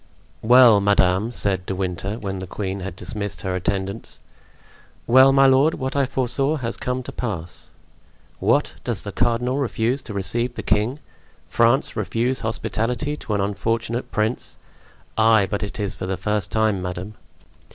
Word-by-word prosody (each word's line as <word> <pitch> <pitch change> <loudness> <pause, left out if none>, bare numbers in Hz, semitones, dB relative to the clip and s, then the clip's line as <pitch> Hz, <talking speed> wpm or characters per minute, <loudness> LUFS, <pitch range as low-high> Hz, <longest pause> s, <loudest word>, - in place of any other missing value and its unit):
Well, 120 -2 +7
madame," 100 +1 +3
said 95 -6 -1
De 95 - -2
Winter, 95 +2 -3
when 95 -4 -4
the 95 - -6
queen 95 +1 -4
had 95 -2 -6
dismissed 100 +1 -5
her 95 -1 -2
attendants. 95 +3 -3 0.9
"Well, 130 +3 +7
my 135 0 +5
lord, 135 +4 +4
what 130 0 -4
I 140 -2 +2
foresaw 135 +3 0
has 120 -6 -3
come 125 0 -3
to - - -7
pass." 90 -8 -5 0.7
"What? - - +2
does - - -3
the - - -5
cardinal 120 +3 0
refuse 125 0 0
to 110 - -8
receive 115 +6 -1
the - - -5
king? 110 +6 +1 0.5
France 120 +4 +2
refuse 115 +5 0
hospitality 115 +5 -2
to 105 - -3
an 100 - 0
unfortunate 115 +4 -2
prince? 110 +3 -2 0.6
Ay, 110 -2 +5
but 100 - -3
it 100 +2 -5
is 100 -2 -2
for 95 - -6
the 95 0 -2
first 105 +1 -1
time, 110 -3 +1
madame!" 90 +3 -5
110 Hz, 160 wpm, -22 LUFS, 100-125 Hz, 0.9 s, Well